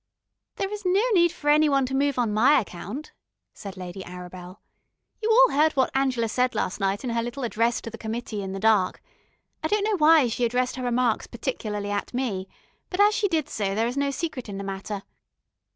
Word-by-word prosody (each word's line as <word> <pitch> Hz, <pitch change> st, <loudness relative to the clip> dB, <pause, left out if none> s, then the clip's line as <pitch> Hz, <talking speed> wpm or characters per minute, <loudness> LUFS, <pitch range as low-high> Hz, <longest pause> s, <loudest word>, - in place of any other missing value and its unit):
"There 390 Hz, +1 st, -3 dB
is 420 Hz, 0 st, -6 dB
no 380 Hz, +3 st, +3 dB
need 345 Hz, -3 st, +4 dB
for 320 Hz, -4 st, -9 dB
any 305 Hz, 0 st, +5 dB
one 275 Hz, -2 st, +2 dB
to 260 Hz, -, -5 dB
move 280 Hz, 0 st, +1 dB
on 235 Hz, -4 st, +1 dB
my 250 Hz, +8 st, +5 dB
account," 205 Hz, -, -7 dB, 0.4 s
said 200 Hz, -2 st, -9 dB
Lady 180 Hz, +1 st, -7 dB
Arabel. 180 Hz, +1 st, -9 dB, 0.6 s
"You 440 Hz, -, 0 dB
all -, -, +6 dB
heard 310 Hz, +2 st, +4 dB
what 265 Hz, -1 st, +1 dB
Angela 260 Hz, -4 st, +1 dB
said 250 Hz, +3 st, 0 dB
last 185 Hz, -, -2 dB
night 195 Hz, +2 st, 0 dB
in 250 Hz, -, -2 dB
her 230 Hz, 0 st, 0 dB
little 240 Hz, +4 st, -5 dB
address 230 Hz, 0 st, 0 dB
to 230 Hz, -, -7 dB
the 230 Hz, -, -9 dB
committee 220 Hz, -1 st, -4 dB
in 190 Hz, -1 st, -5 dB
the 195 Hz, -, -4 dB
dark. 210 Hz, -3 st, +2 dB, 0.6 s
I -, -, +1 dB
don't 420 Hz, -1 st, +1 dB
know 425 Hz, -1 st, +1 dB
why 310 Hz, -4 st, +6 dB
she 235 Hz, +1 st, -2 dB
addressed 250 Hz, +2 st, 0 dB
her 255 Hz, -, -4 dB
remarks 245 Hz, -2 st, +1 dB
particularly 215 Hz, -4 st, -4 dB
at 205 Hz, +4 st, -3 dB
me, 205 Hz, -8 st, -2 dB, 0.4 s
but 365 Hz, -, -4 dB
as 415 Hz, +1 st, +6 dB
she 420 Hz, -1 st, +1 dB
did 320 Hz, -5 st, 0 dB
so, 200 Hz, -7 st, -2 dB
there 225 Hz, +2 st, +1 dB
is 240 Hz, +2 st, -2 dB
no 280 Hz, 0 st, +1 dB
secret 275 Hz, -5 st, -4 dB
in 195 Hz, -, -5 dB
the 200 Hz, -, -5 dB
matter. 195 Hz, +1 st, -5 dB
245 Hz, 215 wpm, -25 LUFS, 205-295 Hz, 0.6 s, all